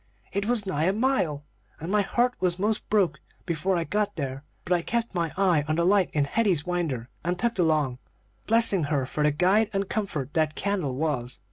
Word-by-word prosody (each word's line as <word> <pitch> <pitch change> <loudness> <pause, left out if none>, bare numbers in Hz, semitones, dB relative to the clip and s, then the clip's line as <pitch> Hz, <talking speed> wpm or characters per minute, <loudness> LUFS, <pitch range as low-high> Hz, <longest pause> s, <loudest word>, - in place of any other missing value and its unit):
It 200 +1 -1
was 235 -3 +1
nigh 155 -4 0
a 190 - +2
mile, 200 - 0 0.3
and 165 +4 -5
my 210 0 +3
heart 240 +5 +1
was 180 -2 +1
'most 210 +3 -1
broke 185 -8 +2 0.3
before 175 +2 0
I 170 - 0
got 205 +5 -1
there; 135 -3 -4 0.2
but 180 - +1
I 175 - +2
kept 235 +5 -2
my 170 -3 -1
eye 180 -6 +3
on 155 - +1
the 170 +1 +1
light 195 0 +3
in 145 -2 +1
Hetty's 185 -2 +1
winder 165 -10 -2 0.2
and 175 +2 -1
tugged 235 +2 -1
along, 150 -7 +1 0.5
blessing 220 -7 +3
her 140 -3 0
for 150 - -4
the 150 - +5
guide 190 +8 +3
and 195 0 -1
comfort 155 - -3
that 155 -1 +1
candle 185 -10 -1
was. 130 -4 -2
175 Hz, 205 wpm, -26 LUFS, 150-205 Hz, 0.5 s, the